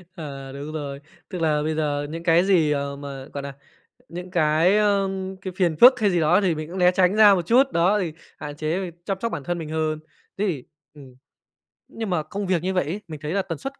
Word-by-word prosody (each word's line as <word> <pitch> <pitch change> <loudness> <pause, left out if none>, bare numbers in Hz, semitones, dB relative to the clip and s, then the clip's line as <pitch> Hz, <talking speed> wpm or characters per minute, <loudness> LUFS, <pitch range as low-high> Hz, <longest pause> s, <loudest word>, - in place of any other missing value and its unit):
À, 140 -5 -8
đúng 145 +3 -7
rồi, 140 -2 -5 0.3
tức 180 -4 -5
là 150 -2 +1
bây 155 0 -1
giờ 145 -2 -1
những 165 +1 -6
cái 170 +1 +4
gì, 165 -6 +3
ờ, 140 -1 -2
mà, 140 -1 -8
gọi 140 -1 -5
là, 140 -1 -6 0.6
những 180 +2 -8
cái, 170 +2 +3
ơ, 200 -2 +2 0.3
cái 185 - -5
phiền 170 -5 +1
phức 245 - +7
hay 205 -2 +3
gì 175 -2 +1
đó 175 +6 +4
thì 180 -5 +1
mình 155 0 -6
cũng 185 +2 -6
né 180 0 +5
tránh 185 +1 +2
ra 210 -2 +8
một 175 -3 -2
chút, 260 +3 +4
đó 185 +5 +3
thì 170 -5 -3 0.3
hạn 145 -1 -7
chế, 170 +4 -2
chăm 195 -2 -2
sóc 230 - -2
bản 145 - -5
thân 175 +3 -2
mình 160 -2 -6
hơn. 155 -1 -1 0.4
Thế 205 - 0
thì, 145 -8 -3 0.3
ừm, 135 -4 -14 0.7
nhưng 225 -3 -6
mà 175 -4 0
công 200 +5 -5
việc 180 -3 0
như 190 +1 -1
vậy 180 - +1
ấy, 180 +8 -4
mình 155 -3 -8
thấy 150 +4 -3
là 200 - +1
tần 165 -4 -5
suất 270 - -7
165 Hz, 245 wpm, -23 LUFS, 150-190 Hz, 0.7 s, ra